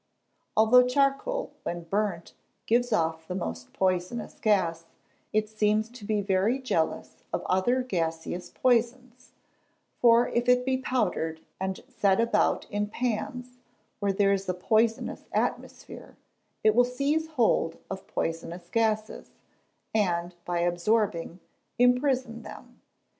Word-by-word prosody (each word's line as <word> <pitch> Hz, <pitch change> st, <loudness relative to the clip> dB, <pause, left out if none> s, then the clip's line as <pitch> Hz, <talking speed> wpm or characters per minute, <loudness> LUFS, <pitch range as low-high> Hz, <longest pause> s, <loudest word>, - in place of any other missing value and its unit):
Although 250 Hz, +3 st, +6 dB
charcoal, 275 Hz, -, 0 dB
when 175 Hz, 0 st, -4 dB
burnt, 190 Hz, -1 st, -2 dB, 0.3 s
gives 245 Hz, +2 st, +2 dB
off 160 Hz, -5 st, 0 dB
the 180 Hz, -, -4 dB
most 85 Hz, -, -5 dB
poisonous 185 Hz, +4 st, -1 dB
gas, 170 Hz, -6 st, +1 dB, 0.5 s
it 215 Hz, 0 st, +1 dB
seems 215 Hz, 0 st, +1 dB
to 240 Hz, -2 st, -13 dB
be 210 Hz, 0 st, 0 dB
very 200 Hz, +5 st, +1 dB
jealous 210 Hz, -12 st, -2 dB
of -, -, -2 dB
other 245 Hz, +8 st, +2 dB
gaseous 170 Hz, -4 st, -3 dB
poisons; 250 Hz, +1 st, 0 dB, 0.7 s
for 235 Hz, 0 st, +5 dB
if 240 Hz, +1 st, 0 dB
it 250 Hz, 0 st, +4 dB
be 260 Hz, 0 st, +1 dB
powdered, 180 Hz, -11 st, -1 dB, 0.2 s
and 190 Hz, 0 st, -3 dB
set 200 Hz, -7 st, +1 dB
about 230 Hz, 0 st, +2 dB
in 205 Hz, 0 st, -1 dB
pans 250 Hz, +2 st, -3 dB, 0.4 s
where 200 Hz, -2 st, +1 dB
there 200 Hz, 0 st, +3 dB
is 195 Hz, -1 st, -2 dB
a 185 Hz, -, 0 dB
poisonous 220 Hz, +5 st, 0 dB
atmosphere, -, -, -4 dB, 0.5 s
it 215 Hz, -, +5 dB
will 245 Hz, +3 st, +5 dB
seize 280 Hz, +6 st, 0 dB
hold 165 Hz, -8 st, +2 dB
of 190 Hz, 0 st, -7 dB
poisonous 170 Hz, +1 st, -4 dB
gases, 215 Hz, -1 st, 0 dB, 0.6 s
and, 175 Hz, -5 st, 0 dB
by 175 Hz, -1 st, -1 dB
absorbing, 175 Hz, 0 st, 0 dB, 0.4 s
imprison 250 Hz, -1 st, +2 dB
them. -, -, -12 dB
215 Hz, 125 wpm, -27 LUFS, 180-245 Hz, 0.7 s, Although